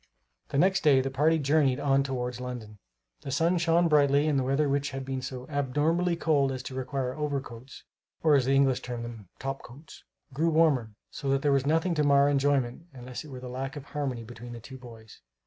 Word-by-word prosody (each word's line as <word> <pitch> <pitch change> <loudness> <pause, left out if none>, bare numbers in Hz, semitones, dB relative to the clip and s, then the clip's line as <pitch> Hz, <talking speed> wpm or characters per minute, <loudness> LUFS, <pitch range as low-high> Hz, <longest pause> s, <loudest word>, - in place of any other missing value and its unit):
The - - -2
next 185 +3 +3
day 140 -3 +5
the 135 +1 -1
party 155 +5 +3
journeyed 145 -2 +2
on 135 -1 +2
towards 125 -2 -3
London. 115 -4 -7 0.4
The - - -7
sun 165 +6 +2
shone 170 0 +3
brightly 145 -1 +4
and 145 -3 +2
the - - 0
weather, 135 +3 +1
which 140 +1 0
had 135 0 -6
been 130 -1 -3
so 125 0 -6
abnormally 150 +5 0
cold 145 -5 +2
as 130 -1 -5
to 130 - -7
require 130 0 -3
overcoats, 140 -4 -5 0.4
or 155 -2 +5
as 135 -3 +4
the 135 +1 +2
English 135 -2 +3
term 120 -2 -5
them, 115 -5 -9
"top 135 0 -4
coats," 140 +6 -14 0.3
grew 160 +5 +1
warmer, 145 -9 +2 0.2
so 140 - -4
that 135 0 +1
there 145 - +3
was 140 0 +2
nothing 165 +3 +2
to 150 -2 +1
mar 140 0 +4
enjoyment 140 +1 0
unless 125 -1 -8
it - - -12
were 130 -2 -8
the 125 - -7
lack 130 +2 -5
of 145 - -7
harmony 140 -6 -4
between 120 +1 -10
the 120 - -8
two 130 +3 -11
boys. 115 -3 -13
135 Hz, 215 wpm, -28 LUFS, 125-150 Hz, 0.4 s, day